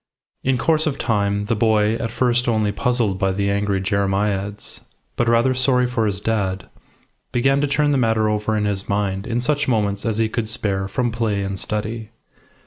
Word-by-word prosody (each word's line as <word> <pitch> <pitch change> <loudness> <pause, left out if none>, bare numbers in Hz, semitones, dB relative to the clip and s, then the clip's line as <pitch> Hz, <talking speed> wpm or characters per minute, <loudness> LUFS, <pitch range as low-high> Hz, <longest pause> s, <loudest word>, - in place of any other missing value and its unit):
In 130 -1 +1
course 155 +4 +2
of 145 - -1
time 100 -2 0
the 115 +2 0
boy, 110 -1 +2
at 115 0 -2
first 120 +1 +1
only 110 -3 +1
puzzled 110 -3 0
by 95 -1 +1
the 100 +1 0
angry 100 -1 0
jeremiads, 100 +1 -1 0.4
but 120 - +1
rather 115 +3 +3
sorry 130 -1 +3
for 120 -3 0
his 100 -1 -2
dad, 95 -4 -2 0.6
began 135 +3 +2
to 145 - +1
turn 145 +1 +1
the 140 - +2
matter 110 -2 +2
over 105 0 0
in 105 - 0
his 100 -1 -2
mind 100 -1 -1
in 120 0 -1
such 145 +4 0
moments 105 -5 0
as 110 -3 -1
he 110 0 +2
could 110 0 -3
spare 95 -3 0
from 120 +4 -1
play 110 -3 -1
and 95 0 -3
study. 110 +1 -3
110 Hz, 190 wpm, -21 LUFS, 100-120 Hz, 0.6 s, rather